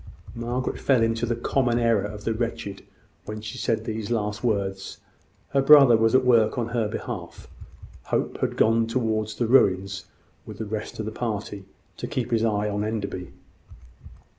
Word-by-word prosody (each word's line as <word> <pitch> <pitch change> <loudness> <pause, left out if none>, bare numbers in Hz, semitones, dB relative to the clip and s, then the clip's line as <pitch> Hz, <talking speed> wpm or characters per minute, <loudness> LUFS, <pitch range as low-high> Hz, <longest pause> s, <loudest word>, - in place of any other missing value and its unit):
Margaret 120 +2 -3
fell 130 -4 +3
into 115 +1 0
the 120 - 0
common 120 0 +1
error 115 -3 +3
of 105 0 -7
the 115 - 0
wretched, 115 -3 -4 0.4
when 105 +1 -6
she 105 0 -7
said 115 - -1
these 110 -1 -4
last 105 -1 -2
words. 100 -4 -2 0.5
Her 135 - +2
brother 140 -3 +8
was 115 +2 +3
at 130 -1 +4
work 115 -3 +4
on 120 -1 -1
her 115 -2 0
behalf. - - -6 0.6
Hope - - -2
had - - -2
gone 115 +1 +3
towards 110 -3 -1
the 120 - 0
ruins 100 -5 +2 0.4
with 105 - -10
the 110 - -4
rest 110 +1 -5
of 110 - -2
the 110 - -4
party, 105 -4 -4 0.3
to - - -5
keep 125 -1 -3
his 115 -1 +2
eye 105 -2 +1
on 105 0 -2
Enderby. 100 -4 -4
110 Hz, 170 wpm, -25 LUFS, 105-120 Hz, 0.6 s, brother